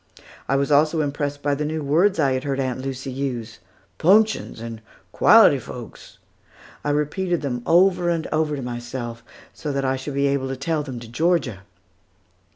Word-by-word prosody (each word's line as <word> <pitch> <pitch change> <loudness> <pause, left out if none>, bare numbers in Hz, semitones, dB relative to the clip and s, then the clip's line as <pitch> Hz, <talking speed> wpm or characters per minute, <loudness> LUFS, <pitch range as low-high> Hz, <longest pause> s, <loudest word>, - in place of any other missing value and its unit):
I 135 - +2
was 140 +2 0
also 155 +2 +4
impressed 145 0 -3
by 145 0 +1
the 145 +2 -2
new 155 0 -3
words 165 +8 +3
which - - +2
I 135 - +2
had 130 0 -1
heard 140 -1 -2
Aunt 130 -1 -2
Lucy 135 0 -5
use, 125 -4 -4 0.4
"'punctions," 215 - +3
and 115 -1 -7 0.3
"quality - - +6
folks." - - -10 0.7
I 145 - -1
repeated 155 +4 -1
them 125 -3 -2
over 175 +1 +4
and 165 -2 -1
over 155 -1 0
to 135 - -5
myself, 120 -1 -6 0.3
so 150 - -5
that 140 -1 -1
I 130 0 0
should 135 +2 -6
be 140 0 +2
able 140 -1 0
to 135 0 -4
tell 155 +3 -1
them 130 -4 -6
to 120 - -9
Georgia. 135 - 0
140 Hz, 180 wpm, -22 LUFS, 130-155 Hz, 0.7 s, quality